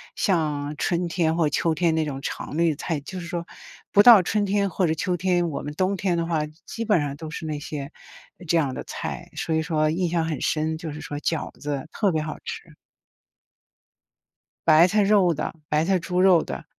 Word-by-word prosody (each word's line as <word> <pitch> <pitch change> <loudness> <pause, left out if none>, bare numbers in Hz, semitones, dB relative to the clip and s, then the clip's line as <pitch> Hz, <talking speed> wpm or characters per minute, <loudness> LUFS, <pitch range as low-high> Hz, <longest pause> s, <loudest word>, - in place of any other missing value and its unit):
像 150 -5 0
春 175 -1 0
天 165 -2 0
或 165 -2 +2
秋 160 +2 0
天 165 +1 +2
那 160 0 +1
种 140 -3 -4
常 150 - -5
绿 165 -1 +3
菜。 155 +1 -3
就 185 +6 -7
是 170 - -7
说 170 -1 -4 0.5
不 205 - +6
到 225 -4 +9
春 210 +3 0
天 200 0 +1
或 180 0 +1
者 160 - 0
秋 180 +2 -1
天， 175 0 +1
我 - - -4
们 145 - -5
冬 190 +4 +1
天 185 -2 0
的 170 - 0
话， 165 -2 0 0.3
基 230 - -5
本 210 -5 +3
上 140 -1 -3
都 160 0 -7
是 160 - -6
那 155 -2 -3
些 145 -1 -6 0.6
这 170 - +3
样 140 -5 +1
的 - - -5
菜， - - -6
所 160 - -2
以 160 - +2
说 155 -2 +1
印 175 +2 0
象 165 -1 0
很 160 -2 -3
深， 160 0 0
就 160 -1 -5
是 150 +1 -8
说 145 0 -5
饺 160 +1 -2
子， 145 -1 -4
特 205 -4 +1
别 160 - 0
好 155 - -5
吃。 - - -8 1.9
白 160 +3 +7
菜 205 +3 +2
肉 200 -3 +4
的， 155 - -3 0.2
白 150 +1 +2
菜 190 0 +2
猪 180 +2 -2
肉 185 -3 +6
的。 - - -7
165 Hz, 230 characters per minute, -24 LUFS, 155-180 Hz, 1.9 s, 到